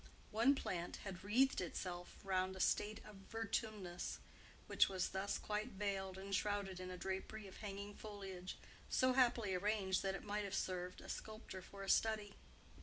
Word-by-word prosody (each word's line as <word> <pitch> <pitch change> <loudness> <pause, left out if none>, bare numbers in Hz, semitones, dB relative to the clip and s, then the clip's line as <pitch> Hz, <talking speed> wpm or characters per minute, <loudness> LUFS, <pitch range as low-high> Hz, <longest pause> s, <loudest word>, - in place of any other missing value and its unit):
One 235 +6 +6
plant 175 -9 -2
had 190 -2 -5
wreathed 250 +6 +4
itself 175 0 -4
round 190 -1 +1
a - - -7
statue 210 +3 +2
of 210 -2 -10
Vertumnus, 215 -5 -2 0.5
which - - +5
was 190 -2 0
thus 190 +1 0
quite 215 +3 -2
veiled 190 -1 -1
and 195 +1 -5
shrouded 200 -2 +1
in 185 0 -4
a 180 - -5
drapery 190 +3 -3
of 190 - -9
hanging 200 0 -5
foliage, 195 -4 -6 0.3
so 255 0 +4
happily 240 -6 +4
arranged 190 0 +2
that 195 0 0
it - - -6
might 210 0 -1
have 195 -1 -2
served 180 -1 -1
a - - -10
sculptor 215 -3 -5
for 195 +2 -8
a - - -5
study. 215 -2 +3
200 Hz, 170 wpm, -41 LUFS, 185-215 Hz, 0.5 s, One